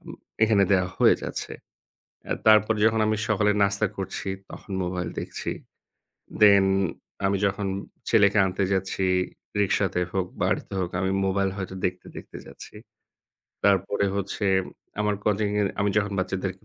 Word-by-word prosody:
আম - - -12 0.3
এখানে 110 -2 +4
দেওয়া 90 -1 +2
হয়ে - - +6
যাচ্ছে। - - -5 0.7
অ্যা - - -2
তারপর 110 0 +6
যখন 110 0 +3
আমি 110 0 +1
সকালে 105 -1 +3
নাস্তা 100 +1 +2
করছি 95 0 -5 0.2
তখন 100 - -10
মোবাইল 90 -1 -3
দেখছি। - - -5 0.9
Then 100 -2 +7 0.6
আমি 100 0 +2
যখন 100 0 -1 0.4
ছেলেকে 105 -2 +4
আনতে 95 +1 -1
যাচ্ছি, 95 0 -1 0.6
রিক্সাতে 95 -2 +1
হোক, 95 -1 0 0.2
বাড়িতে - - -1
হোক, 90 -2 -1
আমি 95 - 0 0.2
মোবাইল 95 0 +1
হয়তো 95 -1 -5
দেখতে, 90 0 -3
দেখতে - - -10
যাচ্ছি। - - -12 0.9
তারপরে 100 0 +2
হচ্ছে 100 +1 -3 0.6
আমার 105 -1 +1
coaching-এর 105 -1 +1
আমি 100 0 +2
যখন 105 -1 +1
বাচ্চাদেরকে 95 0 -3
100 Hz, 135 wpm, -25 LUFS, 95-105 Hz, 0.9 s, Then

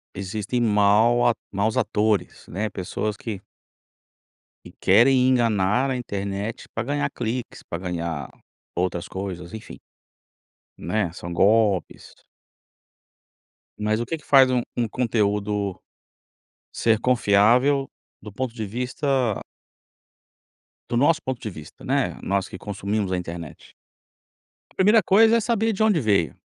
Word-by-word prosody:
existem 100 +5 -3
mau 110 +2 +4
atu 120 - +1
maus 100 +3 0
atores, 105 -1 0
né, 105 +5 -3
pessoas 105 +3 -3
que 110 -3 -6 1.3
que - - -12
querem 125 +6 +5
enganar 120 0 +2
a - - 0
internet, 100 -1 -4
pra 110 - -1
ganhar 145 +4 -1
cliques, 120 +2 -4
pra 85 - -6
ganhar 85 -5 -4 0.4
outras 90 -1 -2
coisas, 90 -3 -6
enfim. 110 - -9 1.0
Né, 90 0 -2
são 85 -1 -7
golpes. 100 +1 +1 1.7
Mas, 110 +1 0
o 120 - -2
que 165 - -3
que 150 - -17
faz 135 -2 +6
um 125 -1 +1
um 120 -2 0
conteúdo, 105 -4 -1 0.9
ser 115 -2 +2
confiável 125 +4 +3 0.3
do 105 - -10
ponto 125 +2 -4
de 110 -3 -4
vista 125 +1 -1 1.5
do 120 - -1
nosso 160 +5 +3
ponto 130 -2 -4
de - - -5
vista, 80 -5 -12
né, - - 0
nós 100 0 0
que 95 - -9
consumimos 100 0 -3
a - - +1
internet? 85 -2 -8 1.1
Primeira 210 +3 +5
coisa 225 +5 +5
é - - +3
saber 225 0 +1
de 210 - -1
onde 205 -7 +3
veio, 100 - +1
110 Hz, 125 wpm, -23 LUFS, 100-125 Hz, 1.7 s, faz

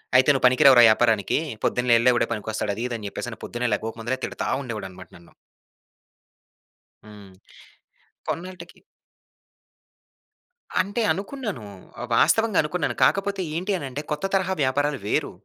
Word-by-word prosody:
"అయితే 130 +3 +5
నువ్వు 130 -2 +1
పనికి 130 +4 +4
రావు 135 -2 +8
రా - - +9
యాపారానికీ. 110 -2 +2 0.3
పొద్దున్నే 125 -1 +2
యెళ్ళే 125 +2 +4
వాడే - - +1
పనికొస్తాడు." 105 -1 -3
అదీ, 115 - -4
ఇదీ 120 - -3
అని 105 - -6
చెప్పేసని, - - -7
పొద్దున్నే 120 0 -3
లేగవక 110 +2 -3
ముందలే 130 +3 -3
తిడతా - - -5 0.2
ఉండేవాడనమాట 105 -7 -8
నన్ను. 85 -1 -20 1.7
హ్మ్. 105 -2 -14 1.0
కొన్నాల్టకి 180 0 -6 2.0
అంటే, 205 +5 -3
అనుకున్నాను. 200 - -5 0.4
ఆహ్, 120 - -5
వాస్తవంగా 220 - +3
అనుకున్నాను. 150 -5 -2
కాకపోతే, 195 0 +1
ఏంటి 185 +5 -2
అనంటే, 140 -3 -5
కొత్త 150 +5 -2
తరహా 190 -1 +1
వ్యాపారాలు 140 +1 0
వేరు. - - 0
130 Hz, 130 wpm, -24 LUFS, 115-180 Hz, 2.0 s, రా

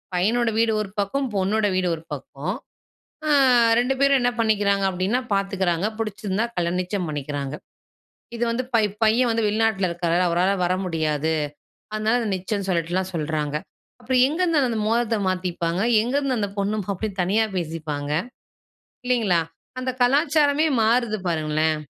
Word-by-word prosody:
பையனோட 225 +6 +2
வீடு 230 0 +3
ஒரு 205 - -5
பக்கம், 270 +8 0
பொண்ணோட 205 +3 +1
வீடு 185 -1 +1
ஒரு 160 - -12
பக்கம். 145 +6 -5 0.7
அ - - +1 0.5
2 250 +2 +1
பேரும் 275 -1 +4
என்ன 245 0 +2
பண்ணிக்கிறாங்க 205 -3 +2
அப்படின்னா, 190 +6 0
பாத்துக்குறாங்க, 195 -3 0
புடிச்சிருந்தா 215 -1 -2
கல்யா 170 -1 0
நிச்சயம் 180 -1 -3
பண்ணிக்கிறாங்க. 145 -1 -4 0.8
இது 235 - 0
வந்து 240 +2 -1
பை 225 -2 +4 0.2
பையன் 235 +3 +3
வந்து 225 -1 +1
வெளிநாட்டில 210 -3 +1
இருக்கறாரு, 170 +1 0
அவரால 180 +3 +2
வர 180 +1 +1
முடியாது. 160 -3 0 0.6
அதனால 215 +2 +1
அதை 225 - -2
நிச்சயன்னு 195 +1 -3
சொல்லிட்டு 180 +2 -1
சொல்றாங்க. 150 -2 -2 0.5
அப்றம் 250 +1 +3
எங்கருந்து 330 0 +1
அந்த 225 - -1
மோதரத்தை 230 -1 +1
மாத்திப்பாங்க? 180 -1 -2 0.2
எங்கருந்து 265 +1 0
அந்த 205 -1 -1
பொண்ணும், 205 0 -1
மாப்ளயும் 200 0 -3
தனியா 210 +5 +2
பேசிப்பாங்க? 155 -4 -4 1.0
இல்லைங்களா? 220 -9 +2 0.4
அந்த 255 0 -1
கலாச்சாரமே 290 +3 +3 0.2
மாறுது 230 0 +2
பாருங்களேன். 155 -1 0
200 Hz, 135 wpm, -23 LUFS, 175-230 Hz, 1.0 s, பேரும்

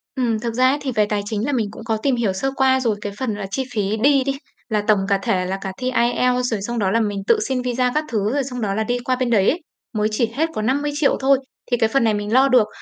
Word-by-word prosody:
Ừm, 235 -5 0
thực 235 0 -3
ra 255 +2 +4
ấy 280 - +1
thì 270 -2 -2
về 215 -2 +2
tài 210 -1 -1
chính 215 +1 -2
là 290 - -1
mình 235 -6 0
cũng 225 - -10
có 220 0 -1
tìm 260 +4 +1
hiểu 225 -5 0
sơ 270 +8 -1
qua 265 -1 +3
rồi, 230 -5 0
cái 205 -1 -5
phần 245 -5 -1
là 205 -1 -5
chi 265 - -1
phí 210 0 0
đi 280 -1 +5
đi, 275 +1 -2 0.3
là 210 -1 0
tổng 210 -2 +4
cả 200 -1 +3
thể 185 -1 0
là 190 +1 -2
cả 190 - -4
thi 255 0 -2
IELTS 250 +1 +1
rồi, 210 - -1
xong 235 +4 -3
đó 190 -3 +1
là 230 - +2
mình 205 -3 -1
tự - - +4
xin 260 -2 -1
visa 250 0 0
các 305 - +2
thứ, 215 +1 0
rồi 285 - +1
xong 250 -2 -6
đó 200 -3 -1
là 220 - 0
đi 245 +2 -1
qua 255 - +1
bên 255 -1 -1
đấy 205 -5 +4
ấy, 340 - -1 0.4
mới 210 - +2
chỉ 225 +1 0
hết 320 +4 +1
có 215 - -2
50.000.000 285 +5 +1
thôi, 270 +1 +4 0.3
thì 245 - +3
cái 225 -2 +2
phần 270 +2 +2
này 220 -1 +3
mình 205 +1 -3
lo 265 +2 +5
được. 250 -5 +4
235 Hz, 300 wpm, -21 LUFS, 210-260 Hz, 0.4 s, đi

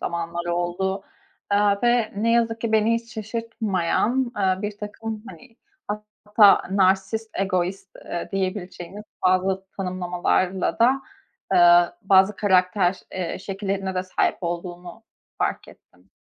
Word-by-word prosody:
zamanlar 170 0 -3
oldu. 175 +3 -1 0.5
Eee, 200 0 +3
ve 240 -2 +2
ne 230 +3 +1
yazık 230 -1 +1
ki 230 -1 -2
beni 220 +1 +3
hiç 230 -1 -5
şaşırtmayan, 225 +2 -1
eee, 190 0 +1
birtakım, 210 +1 -5
hani, 245 -2 -14 0.7
hatta 210 -1 +6
narsist, 195 +3 +1
egoist, 190 0 -1 0.2
eee, 175 - -5
diyebileceğimiz 190 0 -4 0.2
bazı 190 +1 +1
tanımlamalarla 185 0 -1
da, 260 +4 +3 0.5
eee, 175 0 +7 0.2
bazı 195 +1 +4
karakter, 185 -1 +2
eee, 185 -2 -3
şekillerine 195 0 -3
de 185 - 0
sahip 185 - 0
olduğunu 175 +3 -6 0.4
fark - - -2
ettim. - - -20
195 Hz, 115 wpm, -23 LUFS, 185-220 Hz, 0.7 s, eee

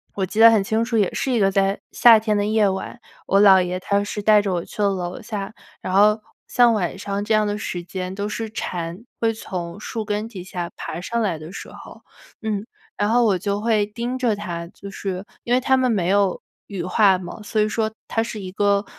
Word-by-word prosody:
我 195 - 0
记 210 +4 -5
得 230 +1 +10
很 220 -3 +3
清 220 +3 0
楚， 230 -1 -1
也 205 -4 +2
是 265 - -1
一 240 - +2
个 195 -1 +3
在 195 0 +1
夏 230 -2 +7
天 215 -1 0
的 205 - +1
夜 215 -1 +3
晚， 190 +5 -4 0.3
我 195 - +4
姥 190 -2 +7
爷 180 +1 -3
他 200 +2 0
是 205 +1 -4
带 210 0 +6
着 200 -2 -2
我 175 -1 -2
去 - - -6
了 200 - +4
楼 185 +3 -4
下， 210 -2 -5 0.3
然 185 - -4
后 210 +2 +5 0.3
像 240 -2 +4
晚 185 -4 -1
上 200 +1 -3
这 220 - +1
样 215 0 +3
的 205 0 -2
时 180 -4 -4
间 185 +1 -5
都 200 +1 -3
是 225 +1 -4
蝉 175 -3 -5 0.2
会 225 -1 +3
从 180 -4 -6
树 220 +1 -4
根 210 +1 -2
底 200 -6 -8
下 175 -2 -5
爬 160 - -5
上 235 +5 -2
来 190 -7 0
的 155 +2 -10
时 - - -8
候， - - -13 0.4
嗯， 215 -2 -2 0.3
然 205 - +1
后 240 +2 +4
我 200 -4 +3
就 200 +2 -2
会 215 -2 +2
盯 235 +4 -4
着 240 -4 +1
它， 175 -5 -5
就 200 +3 -11
是 190 -1 -4 0.2
因 240 - -1
为 250 - +5
它 265 +1 +3
们 255 -1 +2
没 190 -6 0
有 200 -1 +2 0.3
羽 195 -4 -5
化 190 +1 +4
嘛， 180 +3 -8
所 215 +1 0
以 210 - +2
说 220 0 -1 0.2
它 225 - 0
是 225 -1 -6
一 185 -1 -7
个 200 +1 +1
205 Hz, 255 characters per minute, -22 LUFS, 190-220 Hz, 0.4 s, 得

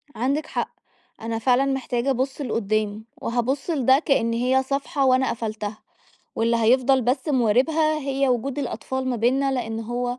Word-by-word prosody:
عندِك 275 +6 0
حق. - - -2 0.5
أنا 225 0 -3
فعلًا 250 +3 +3
محتاجة 265 -2 -1
أبص 265 +2 -1
لقدام، 215 -4 -1 0.2
وهابص 250 +6 -1
لده 270 -4 +4
كأن 255 -7 +1
هي 255 +3 +2
صفحة 275 +1 -1
وأنا 260 0 +3
قفلتها، 215 -2 -4 0.6
واللي 230 +1 +2
هيفضل 255 +3 +3
بس 260 +5 0
مواربها 295 +5 +2
هي 275 -1 0
وجود 255 +3 -1
الأطفال 260 -2 -3
ما 250 - 0
بيننا 265 +4 +1
لأن 225 -3 -3
هو 245 +2 -3
255 Hz, 145 wpm, -23 LUFS, 230-270 Hz, 0.6 s, لده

